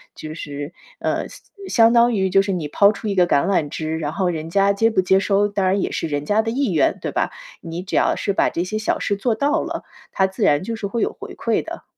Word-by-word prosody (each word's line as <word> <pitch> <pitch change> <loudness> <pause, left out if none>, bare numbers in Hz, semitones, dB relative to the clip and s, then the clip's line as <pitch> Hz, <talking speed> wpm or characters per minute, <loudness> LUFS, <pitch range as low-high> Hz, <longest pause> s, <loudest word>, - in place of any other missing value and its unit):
就 155 0 -7
是， 145 0 -6 0.3
呃， - - -1
相 - - -13 0.3
相 230 -1 +5
当 235 0 +5
于 190 -3 +1
就 195 +1 +4
是 195 0 -2
你 170 -5 -2
抛 200 +7 +4
出 215 +1 -7
一 200 - -1
个 180 -2 +4
橄 140 -4 +2
榄 170 -7 +1
枝， 160 +2 -3
然 150 -2 -3
后 190 -2 0
人 160 -1 -4
家 200 +2 +3
接 225 +3 +2
不 190 - +2
接 190 +1 +3
收， 200 +1 +2
当 200 -2 -1
然 190 +1 +2
也 - - -2
是 - - -2
人 145 -1 -3
家 210 +6 +2
的 225 - -2
意 260 -2 0
愿， 160 - +2
对 - - -3
吧？ - - -1 0.3
你 165 +1 -6
只 190 - -5
要 - - +3
是 200 - -1
把 - - +2
这 170 - -2
些 200 +4 -3
小 215 - -1
事 205 - 0
做 230 +4 0
到 285 +8 +1
了， - - -5 0.3
它 190 - +2
自 190 +3 -4
然 145 -6 +4
就 230 +4 -4
是 220 - -5
会 230 +3 -2
有 - - +1
回 - - -8
馈 - - 0
的。 - - -8
195 Hz, 290 characters per minute, -21 LUFS, 165-215 Hz, 0.3 s, 相